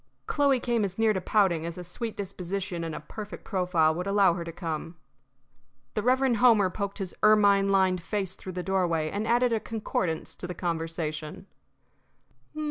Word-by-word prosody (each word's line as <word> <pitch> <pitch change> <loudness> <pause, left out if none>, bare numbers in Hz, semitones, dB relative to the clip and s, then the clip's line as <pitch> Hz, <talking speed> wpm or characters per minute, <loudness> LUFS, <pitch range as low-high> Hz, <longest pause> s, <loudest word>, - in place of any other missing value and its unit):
Chloe 280 -3 +2
came 235 -2 0
as 195 -2 -3
near 225 -1 +3
to 190 - -2
pouting 180 -5 +2
as 170 +1 -5
a 180 - -6
sweet 220 +6 -5
disposition 190 -2 -4
and 160 -2 -4
a - - -6
perfect 205 +7 -8
profile 180 -5 +2
would 180 +4 -4
allow 200 -3 +4
her 170 0 -4
to 170 - -6
come. 165 0 -5 1.0
The - - -1
Reverend 255 0 +3
Homer 220 -6 +5
poked 200 0 -4
his 190 -3 -5
ermine 205 -2 +5
lined 190 -2 +3
face 190 +1 -3
through 185 - -8
the 180 0 -4
doorway 175 -4 0
and 210 +2 -2
added 240 +1 +3
a 225 - +1
concordance 195 -7 -3
to 180 - -5
the 180 - -6
conversation. 165 0 -4
190 Hz, 175 wpm, -27 LUFS, 170-210 Hz, 1.0 s, Homer